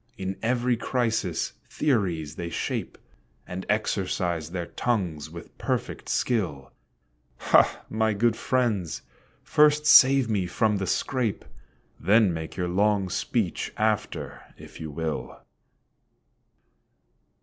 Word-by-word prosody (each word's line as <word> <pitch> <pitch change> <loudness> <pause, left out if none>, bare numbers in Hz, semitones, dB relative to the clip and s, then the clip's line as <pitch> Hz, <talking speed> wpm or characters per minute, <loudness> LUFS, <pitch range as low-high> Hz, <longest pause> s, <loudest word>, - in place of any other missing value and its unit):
In 95 -1 -3
every 120 +1 +1
crisis 110 -8 -1 0.2
theories 90 - 0
they 85 -1 -5
shape, - - -3 0.5
And 90 +1 -6
exercise 90 -6 -1
their 90 -1 -4
tongues 85 -10 -2
with 85 +1 -11
perfect - - -3
skill; 90 - -1 0.7
Ha! - - +3
my 110 0 +1
good 115 +2 +2
friends, 115 - -1 0.4
first 150 0 +4
save 135 -3 +7
me 100 -5 0
from 105 +3 +1
the 95 -1 -3
scrape, 125 -2 -1 0.5
Then 105 -2 +4
make 80 -1 -6
your 90 -1 -1
long 100 +1 +1
speech - - -1
after, 110 -1 -1 0.2
if - - -13
you 80 - -5
will. 70 -5 -4
100 Hz, 110 wpm, -26 LUFS, 85-115 Hz, 0.7 s, save